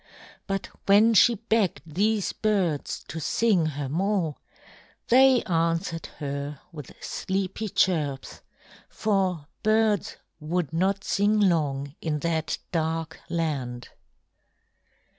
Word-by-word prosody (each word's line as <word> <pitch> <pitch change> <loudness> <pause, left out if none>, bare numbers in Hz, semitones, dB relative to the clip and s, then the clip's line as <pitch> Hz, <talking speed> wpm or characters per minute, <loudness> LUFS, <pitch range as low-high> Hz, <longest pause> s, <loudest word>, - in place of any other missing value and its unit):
But 195 -1 -2 0.2
when 210 +3 +6
she 235 +3 +6
begged 220 -5 0
these 200 +6 0
birds 190 -9 -1
to 160 +5 -5
sing 185 0 +2
her 145 -2 -4
more, 175 0 0 0.7
they 260 0 +6
answered 165 0 -1
her 140 0 -4
with 150 -5 -9
sleepy 195 +3 -3
chirps, 150 -8 0 0.5
for 190 -7 0 0.2
birds 215 -3 +1 0.2
would 160 0 -2
not 190 +3 +1
sing 205 +2 +2
long 145 -8 +1
in 155 -2 -1
that 160 -2 -1
dark 160 -1 -2
land. 135 -8 -3
170 Hz, 105 wpm, -26 LUFS, 155-205 Hz, 0.7 s, when